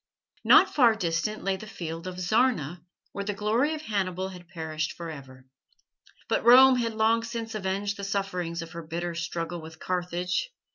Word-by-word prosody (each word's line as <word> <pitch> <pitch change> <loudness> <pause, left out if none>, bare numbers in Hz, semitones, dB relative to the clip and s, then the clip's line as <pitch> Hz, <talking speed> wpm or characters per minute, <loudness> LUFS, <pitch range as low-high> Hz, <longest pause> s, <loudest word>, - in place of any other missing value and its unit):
Not - - +6
far 240 -6 +5
distant 180 +2 -2
lay 195 0 0
the 215 - -10
field 170 -3 -6
of 185 - -5
Zarna, 180 - +1 0.3
where 200 - -4
the 205 0 -3
glory 230 +10 +1
of 310 - -8
Hannibal 190 - -2
had 180 -2 -11
perished 160 -3 -4
for 170 -1 -7
ever. 130 -3 -11 0.8
But - - 0
Rome 255 +2 +8
had 230 -2 -1
long 220 +1 +3
since 230 -1 -5
avenged 200 0 -2
the 200 - -7
sufferings 180 -4 -2
of 165 - -11
her 170 - -6
bitter 170 +2 -4
struggle 170 0 -4
with 160 0 -11
Carthage. 180 - -2
185 Hz, 175 wpm, -27 LUFS, 170-220 Hz, 0.8 s, Rome